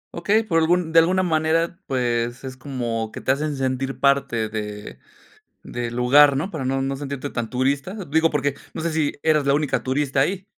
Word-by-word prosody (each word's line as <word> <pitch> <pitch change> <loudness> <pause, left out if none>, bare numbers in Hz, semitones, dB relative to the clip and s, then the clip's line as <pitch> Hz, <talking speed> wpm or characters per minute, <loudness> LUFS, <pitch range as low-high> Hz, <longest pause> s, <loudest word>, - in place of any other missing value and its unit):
Okey, 205 +6 +2
por 165 -7 +1
algún 165 0 +1
de 165 - +7
alguna 185 +3 +3
manera, 165 +1 0
pues, 120 -2 -1
es 130 -1 -6
como 120 -5 -4
que - - -7
te - - 0
hacen 150 +2 -1
sentir 135 0 -2
parte 140 -5 +2
de 105 -1 -6 0.6
del 120 -1 -5
lugar, 135 +3 +5
¿no?, 185 +8 -3
para 155 -5 -4
no 135 +1 0
no 135 0 -2
sentirte 140 0 -5
tan 115 -2 -3
turista. 140 +8 -1
Digo, 160 +3 +3
porque 145 -2 0 0.2
no 160 - -3
sé 170 - -1
si 155 -2 0
eras 155 -3 +2
la 140 - +4
única 150 -1 0
turista 135 +1 -1
ahí. 185 +7 0
140 Hz, 195 wpm, -22 LUFS, 130-160 Hz, 0.6 s, de